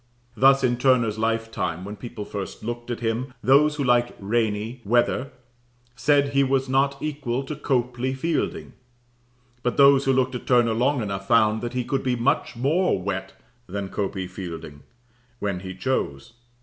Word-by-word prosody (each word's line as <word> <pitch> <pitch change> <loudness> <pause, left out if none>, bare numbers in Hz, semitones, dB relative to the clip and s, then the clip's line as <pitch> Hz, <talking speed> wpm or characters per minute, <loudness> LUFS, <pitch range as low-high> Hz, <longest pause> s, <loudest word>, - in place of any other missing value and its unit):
Thus 135 +1 +5
in 120 -1 +2
Turner's 120 -4 +2
lifetime, 110 -6 -2
when 105 +1 -6
people 110 -1 -7
first 100 0 -6
looked 120 +1 -5
at 120 -1 -4
him, 120 +3 -2
those 150 +3 +5
who 145 - -2
liked 120 -1 +2
rainy, 110 +3 -1
weather, 120 +4 +1 0.7
said 140 +2 +3
he 140 0 +3
was 135 0 +1
not 135 +1 +2
equal 140 -4 -2
to 150 +3 -5
Copley 130 -2 -1
Fielding; 160 +3 -2 0.9
but 125 0 -1
those 140 0 +6
who 135 - +3
looked 130 0 +1
at 125 - -6
Turner 120 -3 +4
long 125 +2 +1
enough 95 -1 -4
found 110 -1 +3
that 120 0 -4
he 125 -1 -1
could 135 +2 -1
be 125 -1 0
much 120 0 0
more 150 - +1
wet 95 0 -4 0.3
than 100 +1 -4
Copley 95 -2 -3
Fielding, 85 -5 -8 0.6
when 100 -5 -2
he 95 0 -7
chose. 95 - -2
120 Hz, 160 wpm, -24 LUFS, 105-135 Hz, 0.9 s, those